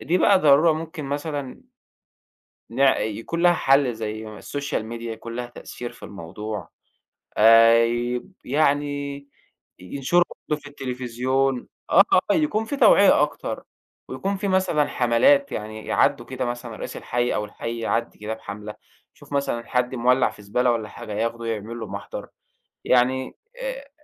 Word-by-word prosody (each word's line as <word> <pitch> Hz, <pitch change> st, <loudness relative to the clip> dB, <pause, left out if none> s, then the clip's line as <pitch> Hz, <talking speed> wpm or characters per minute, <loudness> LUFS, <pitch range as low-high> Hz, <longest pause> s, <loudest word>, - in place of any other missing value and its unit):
دي 180 Hz, +3 st, +1 dB
بقى 195 Hz, -2 st, +5 dB
ضرورة 155 Hz, +1 st, +5 dB
ممكن 160 Hz, -1 st, -5 dB
مثلًا 145 Hz, -1 st, -4 dB, 1.1 s
ن 120 Hz, -, -7 dB, 0.2 s
يكون 115 Hz, +11 st, -3 dB
لها 175 Hz, 0 st, +6 dB
حل 135 Hz, -5 st, +3 dB
زي 110 Hz, 0 st, -5 dB
السوشيال 140 Hz, -6 st, -4 dB
ميديا 115 Hz, 0 st, -5 dB
يكون 115 Hz, +1 st, -8 dB
ليها 125 Hz, 0 st, -3 dB
تأثير 120 Hz, 0 st, -8 dB
في -, -, -19 dB
الموضوع، 105 Hz, +3 st, -7 dB, 0.7 s
آآ 115 Hz, +1 st, +7 dB
يب 120 Hz, +6 st, -2 dB
يعني 145 Hz, 0 st, 0 dB, 0.5 s
ينشروا 140 Hz, -, +1 dB, 0.3 s
برضو 150 Hz, 0 st, -1 dB
في 145 Hz, -, -11 dB
التليفزيون، 130 Hz, 0 st, -1 dB, 0.2 s
آه، -, -, +7 dB, 0.3 s
آه، -, -, +5 dB
يكون 225 Hz, -9 st, +1 dB
في 285 Hz, +4 st, -4 dB
توعية -, -, +6 dB
أكتر، -, -, -2 dB, 0.5 s
ويكون 195 Hz, 0 st, -2 dB
في 200 Hz, -, -2 dB
مثلًا 185 Hz, -6 st, +2 dB
حملات، 275 Hz, -, +3 dB
يعني 110 Hz, 0 st, -6 dB
يعدُّوا -, -, +2 dB
كده 130 Hz, -1 st, -4 dB
مثلًا 120 Hz, -1 st, -5 dB
رئيس -, -, -7 dB
الحي 120 Hz, 0 st, -1 dB
أو 105 Hz, -, -1 dB
الحي 115 Hz, +2 st, -6 dB
يعدِّي 115 Hz, +1 st, -1 dB
كده 105 Hz, +1 st, -4 dB
بحملة 105 Hz, -1 st, -8 dB, 0.4 s
يشوف -, -, -13 dB
مثلًا 130 Hz, -4 st, -1 dB
حد 125 Hz, 0 st, 0 dB
مولع 125 Hz, +2 st, +3 dB
في 105 Hz, -, -14 dB
زبالة 120 Hz, +5 st, +1 dB
والّا 110 Hz, -2 st, -2 dB
حاجة، 105 Hz, -, -8 dB
ياخده 115 Hz, +2 st, -2 dB
يعمل 115 Hz, +1 st, -4 dB
له 110 Hz, -, -5 dB
محضر، 100 Hz, +1 st, -7 dB, 0.6 s
يعني 130 Hz, +1 st, +2 dB, 0.2 s
آآ، -, -, -6 dB
125 Hz, 145 wpm, -23 LUFS, 115-145 Hz, 1.1 s, آآ